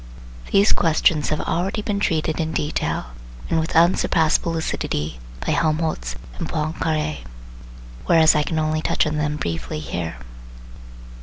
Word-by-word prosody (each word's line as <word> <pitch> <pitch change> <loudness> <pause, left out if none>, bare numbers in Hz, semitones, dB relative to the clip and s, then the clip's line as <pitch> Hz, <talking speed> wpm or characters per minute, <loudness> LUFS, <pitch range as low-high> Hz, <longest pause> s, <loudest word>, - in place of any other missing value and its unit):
These 200 +2 +5
questions 160 -2 +2
have 155 - -1
already 195 +5 -1
been 205 -1 -1
treated 160 -4 0
in 160 0 -1
detail 145 - -2 0.4
and 165 - +3
with 160 - -3
unsurpassable 165 -1 +3
lucidity 75 - -2 0.3
by - - 0
Helmholtz 155 - 0 0.2
and - - -3
Poincaré, 155 0 -1 0.9
whereas 160 -2 +6
I 150 - +2
can 160 +2 -2
only 155 0 0
touch - - +1
on 150 0 -1
them 150 0 0
briefly 85 - -3
here. 80 +1 -4
155 Hz, 135 wpm, -22 LUFS, 150-165 Hz, 0.9 s, whereas